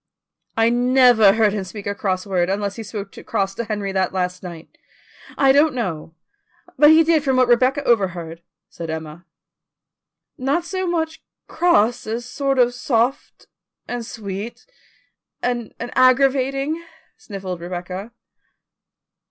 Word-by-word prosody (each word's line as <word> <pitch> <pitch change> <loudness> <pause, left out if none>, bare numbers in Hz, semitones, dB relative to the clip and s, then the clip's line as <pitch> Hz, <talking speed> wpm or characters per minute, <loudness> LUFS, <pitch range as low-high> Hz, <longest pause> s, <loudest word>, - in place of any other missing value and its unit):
"I 225 0 +4
never 245 -4 +5
heard 215 -2 +2
him 205 -2 -2
speak 200 +2 -9
a 200 - -1
cross 185 -2 -2
word, 180 -3 0
unless 200 0 -2
he 230 - -6
spoke 205 -2 -7
cross 195 -1 -1
to 235 - -4
Henry 205 -2 -3
that 190 -1 0
last 180 -1 -2
night. 170 -3 -10 0.6
I 270 -1 +5
don't 290 +1 +4
know, 165 -9 -4 0.6
but 295 - +6
he 320 +1 +7
did 320 -2 +2
from 265 -3 +1
what 255 -1 +4
Rebecca 255 +4 +3
overheard," 175 -8 0 0.3
said 165 -1 -8
Emma. 160 +1 -7 1.1
"Not 280 +7 0
so 370 +1 -3
much 320 -2 -2 0.3
cross 245 -10 +2
as 230 +2 -3
sort 275 +2 -1
of 245 -1 +3
soft, 245 +1 -1 0.4
and 245 -1 -4
sweet, 210 0 -7 0.7
and 240 -3 -2
aggravating," 270 +5 +2 0.3
sniffled 195 - -7
Rebecca. 180 +4 -6
230 Hz, 135 wpm, -21 LUFS, 190-265 Hz, 1.1 s, he